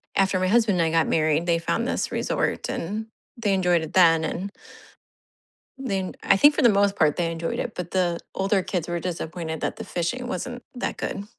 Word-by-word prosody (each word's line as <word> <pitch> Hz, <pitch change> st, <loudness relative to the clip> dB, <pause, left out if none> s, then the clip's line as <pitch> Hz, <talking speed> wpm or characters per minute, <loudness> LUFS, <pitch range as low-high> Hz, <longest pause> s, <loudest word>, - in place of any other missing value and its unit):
after 195 Hz, -1 st, +2 dB
my 185 Hz, -, +1 dB
husband 220 Hz, -3 st, +3 dB
and 165 Hz, -, +3 dB
I -, -, -1 dB
got 165 Hz, -1 st, +2 dB
married, 155 Hz, +1 st, +2 dB
they 170 Hz, -1 st, +2 dB
found 230 Hz, +8 st, -1 dB
this -, -, -1 dB
resort, -, -, -1 dB
and 210 Hz, +6 st, -3 dB, 0.3 s
they 210 Hz, -4 st, +1 dB
enjoyed 180 Hz, -3 st, +2 dB
it 160 Hz, -, -7 dB
then, 165 Hz, -3 st, +5 dB
and 185 Hz, +5 st, -3 dB, 1.3 s
then 195 Hz, -8 st, -2 dB
I 195 Hz, -, +4 dB
think 290 Hz, +8 st, +6 dB
for 305 Hz, -, 0 dB
the 240 Hz, -, +7 dB
most 200 Hz, -1 st, +3 dB
part, 155 Hz, -2 st, +3 dB
they 170 Hz, -2 st, 0 dB
enjoyed 165 Hz, 0 st, -3 dB
it, 235 Hz, -, -3 dB
but 180 Hz, -1 st, -5 dB
the 175 Hz, -2 st, 0 dB
older 195 Hz, 0 st, +1 dB
kids 175 Hz, -3 st, -3 dB
were 175 Hz, 0 st, -2 dB
disappointed 165 Hz, -2 st, -4 dB
that -, -, -2 dB
the -, -, -7 dB
fishing 215 Hz, +9 st, -3 dB
wasn't 245 Hz, -1 st, -4 dB
that 245 Hz, -, -3 dB
good. 200 Hz, -, -4 dB
185 Hz, 205 wpm, -24 LUFS, 165-205 Hz, 1.3 s, the